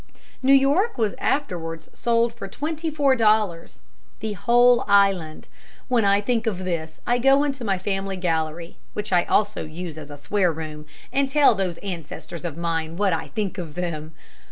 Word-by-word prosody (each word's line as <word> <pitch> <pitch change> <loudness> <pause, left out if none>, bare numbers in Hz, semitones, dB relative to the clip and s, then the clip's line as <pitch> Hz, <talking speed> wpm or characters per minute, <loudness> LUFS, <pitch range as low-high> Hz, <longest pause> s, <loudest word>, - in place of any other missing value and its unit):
New 265 +1 +3
York 285 - +3
was 220 -4 +1
afterwards 165 - -2
sold 235 0 +1
for 230 -4 -7
twenty 315 - -3
four 285 -3 +2
dollars, 215 -7 +1 0.4
the 220 -1 -3
whole 245 +4 +4
island. 195 -6 +2 0.4
When 240 -4 +3
I 200 +1 +4
think 230 +1 0
of 185 -4 -2
this 160 -3 -4
I 245 0 +2
go 270 +3 +5
into 275 -3 -2
my 195 -4 0
family 195 0 -2
gallery, 165 -1 -2 0.2
which 210 -2 -3
I 175 -1 +4
also 210 0 +1
use 160 0 -7
as 150 -1 -10
a 145 - -9
swear 180 +5 +1
room, 155 -1 -7 0.3
and 275 0 +1
tell 285 -2 +5
those 185 -4 -2
ancestors 170 -2 -7
of 165 -3 -5
mine 165 -1 -2
what 200 -2 +2
I 165 - -2
think 205 -3 -3
of 160 -4 -7
them. 160 -3 -4
195 Hz, 175 wpm, -23 LUFS, 165-240 Hz, 0.4 s, go